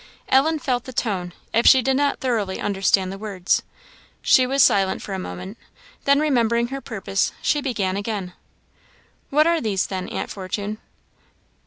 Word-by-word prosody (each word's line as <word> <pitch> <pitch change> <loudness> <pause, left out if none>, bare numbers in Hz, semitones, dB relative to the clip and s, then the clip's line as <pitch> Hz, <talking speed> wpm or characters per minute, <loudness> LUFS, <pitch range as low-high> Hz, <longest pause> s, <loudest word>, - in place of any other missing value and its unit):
Ellen 305 +5 +4
felt 255 -4 -2
the 260 - -8
tone, 195 -8 -2 0.2
if 230 +1 +3
she 260 -2 +7
did 265 +2 +2
not 285 +1 +1
thoroughly 220 -7 -1
understand 195 -1 +1
the 195 - -7
words. 200 -4 0 0.6
She 255 -1 +5
was 270 +1 +4
silent 195 -1 +2
for 200 - -6
a 190 - -3
moment; 185 +3 -7 0.5
then 280 0 +4
remembering 235 -5 +1
her 275 +1 -5
purpose, 195 -5 -2
she 295 - +1
began 205 -9 -1
again 200 -3 -4 1.0
"What 300 +2 +4
are 335 0 +2
these, 200 -4 0
then, 185 -2 -5
aunt - - -4
Fortune?" 205 +2 -4
220 Hz, 160 wpm, -22 LUFS, 195-265 Hz, 1.0 s, she